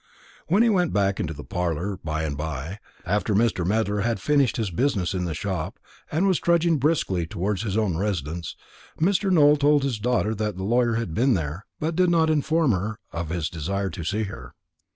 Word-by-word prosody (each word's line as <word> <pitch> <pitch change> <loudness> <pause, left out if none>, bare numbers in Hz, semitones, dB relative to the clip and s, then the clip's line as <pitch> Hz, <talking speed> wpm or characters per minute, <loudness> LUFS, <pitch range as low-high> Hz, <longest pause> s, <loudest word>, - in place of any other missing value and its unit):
When 200 +7 +4
he 235 - +4
went 180 -5 +2
back 100 -1 +1
to 80 - -2
the 75 -2 -7
parlour 90 +2 -2
by 80 0 -2
and 75 -3 -2
by, 80 +5 -5 0.3
after 105 +3 0
Mr. 110 -4 +2
Medler 105 +2 0
had 115 +2 0
finished 145 -4 +2
his 110 -5 -1
business 100 -3 0
in 90 -1 -1
the 80 -3 -3
shop, 95 -2 -3 0.3
and 160 +6 +1
was 190 -3 +3
trudging 170 -2 +2
briskly 120 - +1
towards 100 +1 -2
his 105 -2 -2
own 100 -7 +1
residence, 85 -4 -3 0.4
Mr. 190 +4 +2
Nowell 150 -4 +6
told 145 0 +3
his 130 -6 -1
daughter 115 -1 +1
that 105 -3 -3
the 95 - -4
lawyer 120 +2 +2
had 115 -8 -2
been 125 +6 +3
there, 80 +3 -4
but 160 +2 -1
did 180 0 +3
not 165 -2 +3
inform 155 -1 +2
her 105 +2 -2
of 85 -1 -4
his 85 -2 -1
desire 95 +4 -3
to 85 - -6
see 105 +6 -1
her. 100 -1 -8
105 Hz, 200 wpm, -24 LUFS, 90-145 Hz, 0.4 s, Nowell